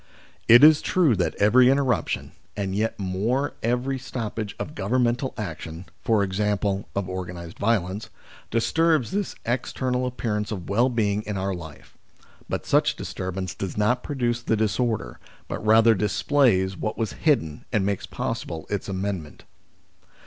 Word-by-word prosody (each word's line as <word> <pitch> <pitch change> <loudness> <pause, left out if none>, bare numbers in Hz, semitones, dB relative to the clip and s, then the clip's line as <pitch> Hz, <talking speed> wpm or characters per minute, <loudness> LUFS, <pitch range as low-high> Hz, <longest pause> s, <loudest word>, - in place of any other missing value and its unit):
It 120 +4 +8
is 155 0 +8
true 165 -10 +3
that 90 - 0
every 125 +5 +5
interruption, 130 - 0 0.3
and 95 -2 -2
yet 110 +2 0
more 105 +9 -1
every 125 +3 0
stoppage 115 -4 -5
of - - -5
governmental 120 +4 0
action, 85 -3 -6 0.2
i.e. 100 -1 +1
of 100 -2 -1
organised 90 -2 -6
violence, 100 -2 0 0.4
disturbs 155 +5 +2
this 200 0 -2
external 125 +1 -1
appearance 110 -4 -2
of 90 -6 -5
well 120 +6 +3
being 105 -4 0
in 105 -2 -2
our 95 +1 -1
life, 80 -5 -10 0.5
but - - -3
such - - +3
disturbance 95 0 -4
does 95 0 -5
not 105 +4 +2
pro 145 - -5
duce 120 -2 0
the 115 -1 0
disorder, 110 - -1 0.3
but - - -5
rather 115 +1 +6
displays 105 -2 +2
what 110 +3 -3
was 115 -3 -2
hidden 80 - 0
and 105 -4 +1
makes 100 -1 -2
possible 80 -1 -4
its 100 -1 -2
amendment. 95 -5 -4
105 Hz, 140 wpm, -25 LUFS, 95-125 Hz, 0.5 s, It